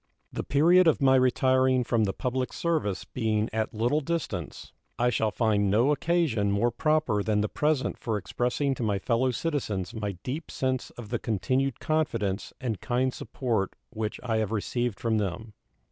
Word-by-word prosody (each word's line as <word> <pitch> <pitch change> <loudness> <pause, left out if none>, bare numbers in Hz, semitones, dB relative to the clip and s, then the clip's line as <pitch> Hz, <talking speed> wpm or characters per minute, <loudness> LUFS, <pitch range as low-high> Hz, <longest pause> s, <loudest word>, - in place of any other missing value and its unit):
The - - -3
period 170 +5 +5
of 160 - +4
my 135 -1 +5
retiring 130 0 +3
from 115 -2 +1
the 95 - 0
public 125 +5 -2
service 155 - -1
being 110 -3 -1
at 110 0 -1
little 120 +8 +1
distance, 165 +2 -4 0.2
I 125 +1 +2
shall 110 0 +1
find 105 -3 +1
no 115 +8 +3
occasion 150 -10 +1
more 110 +4 +2
proper 155 -10 +1
than 105 0 +1
the 105 - +1
present 150 +3 0
for 110 -3 -1
expressing 125 +7 -1
to 130 - -6
my 105 -3 +1
fellow 115 +6 +1
citizens 115 - -2
my 105 -3 -3
deep 145 +5 -4
sense 130 -1 -2
of 115 -4 -10
the 120 0 -1
continued 130 +5 0
confidence 115 -11 -1
and 115 -8 -3
kind 125 +1 0
support 115 -7 -2 0.2
which 110 -2 -4
I 115 -3 0
have 110 -2 -1
received 115 +1 -2
from 115 -2 +1
them. 105 +2 -4
120 Hz, 170 wpm, -27 LUFS, 105-130 Hz, 0.2 s, period